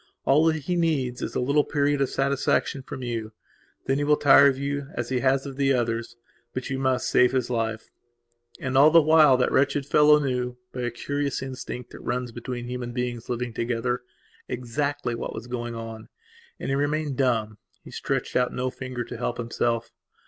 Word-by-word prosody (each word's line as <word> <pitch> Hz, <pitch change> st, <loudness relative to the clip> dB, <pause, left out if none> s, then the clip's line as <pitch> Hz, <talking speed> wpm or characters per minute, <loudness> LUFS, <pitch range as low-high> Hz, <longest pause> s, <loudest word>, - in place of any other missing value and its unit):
All 150 Hz, +4 st, +4 dB
that 160 Hz, -2 st, +1 dB
he 180 Hz, -, -1 dB
needs 145 Hz, -8 st, 0 dB
is -, -, -4 dB
a -, -, +1 dB
little 140 Hz, +4 st, +3 dB
period 145 Hz, 0 st, +1 dB
of 135 Hz, -, +2 dB
satisfaction 140 Hz, 0 st, 0 dB
from 130 Hz, 0 st, -8 dB
you. 115 Hz, -3 st, -4 dB, 0.5 s
Then 135 Hz, +1 st, +1 dB
he -, -, 0 dB
will 150 Hz, 0 st, +3 dB
tire 140 Hz, 0 st, +7 dB
of 135 Hz, -2 st, +2 dB
you 140 Hz, 0 st, -3 dB
as 120 Hz, -1 st, -3 dB
he 130 Hz, -1 st, 0 dB
has 135 Hz, +1 st, +2 dB
of 135 Hz, -1 st, -7 dB
the 135 Hz, -1 st, +3 dB
others. 115 Hz, -1 st, -1 dB, 0.4 s
But 130 Hz, +1 st, -4 dB
you 130 Hz, -, -1 dB
must 130 Hz, -1 st, +1 dB
save 125 Hz, +1 st, +4 dB
his 125 Hz, -2 st, 0 dB
life." 115 Hz, -2 st, -2 dB, 0.7 s
And, 130 Hz, -3 st, -3 dB
all 140 Hz, +3 st, +8 dB
the 165 Hz, +1 st, +7 dB
while, 155 Hz, -4 st, +6 dB
that 125 Hz, -, +1 dB
wretched 140 Hz, +1 st, +2 dB
fellow 150 Hz, +1 st, +6 dB
knewby 125 Hz, -2 st, -3 dB
a -, -, 0 dB
curious 140 Hz, +3 st, -3 dB
instinct 130 Hz, -2 st, -7 dB
that -, -, -10 dB
runs 125 Hz, 0 st, -2 dB
between 120 Hz, +1 st, -6 dB
human 125 Hz, -1 st, -5 dB
beings 120 Hz, -2 st, -3 dB
living 120 Hz, -1 st, -3 dB
togetherexactly 125 Hz, +3 st, -3 dB
what 115 Hz, -, -5 dB
was 110 Hz, -, -6 dB
going 120 Hz, -1 st, -4 dB
on. 115 Hz, -1 st, -8 dB, 0.5 s
And -, -, -4 dB
he 135 Hz, -, +1 dB
remained 145 Hz, 0 st, -1 dB
dumb; 115 Hz, -5 st, 0 dB, 0.2 s
he -, -, -12 dB
stretched -, -, -3 dB
out 125 Hz, 0 st, +2 dB
no 125 Hz, +1 st, -2 dB
finger 130 Hz, -2 st, -5 dB
to 120 Hz, -, -8 dB
help 120 Hz, 0 st, -2 dB
himself. 115 Hz, 0 st, -1 dB
125 Hz, 190 wpm, -25 LUFS, 120-140 Hz, 0.7 s, all